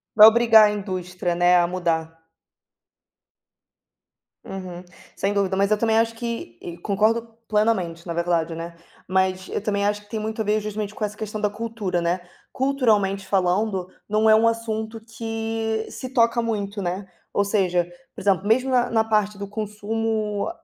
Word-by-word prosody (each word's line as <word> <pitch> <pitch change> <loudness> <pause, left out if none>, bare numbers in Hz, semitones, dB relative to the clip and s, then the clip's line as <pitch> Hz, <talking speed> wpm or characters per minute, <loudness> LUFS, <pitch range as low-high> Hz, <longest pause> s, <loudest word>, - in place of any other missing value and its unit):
Vai 215 0 +11
obrigar 225 -1 +7
a 210 - +2
indústria, 180 -3 -3
né, 175 +1 +5
a 175 -1 +3
mudar. 165 -2 -2 2.2
Uhum, 180 -2 -7 0.3
sem 200 +1 0
dúvida, 195 -2 0
mas 200 0 +2
eu 215 - +3
também 225 0 +2
acho 230 0 0
que 230 - -5
e 170 0 -7
concordo 220 +5 0
plenamente 195 -6 0
na 170 - -2
verdade, 170 -1 0
né, 165 +1 -6 0.3
mas 190 0 0
eu - - -2
também 200 -1 0
acho 205 0 0
que 205 - -25
tem 220 - -3
muito 220 +1 -3
a - - -2
ver 210 +1 +1
justamente 210 0 -4
com - - -5
essa 210 0 -3
questão 215 0 -5
da 210 - +2
cultura, 210 -4 -3
né, 175 +2 0 0.3
culturalmente 215 -8 +1
falando, 190 0 +1 0.2
não 215 +1 +3
é 215 - +8
um 225 +1 +4
assunto 225 -1 -2
que 225 0 -3
se 255 - -6
toca 235 -1 +3
muito, 205 -3 -3
né, 185 +2 -3 0.3
ou 200 - +2
seja, 185 -4 +1 0.3
por - - -7
exemplo, 195 0 +1
mesmo 250 +4 +3
na 245 -1 +3
na 225 -1 +3
parte 210 -2 0
do 200 - -5
consumo 215 +1 -2
210 Hz, 170 wpm, -23 LUFS, 185-225 Hz, 2.2 s, Vai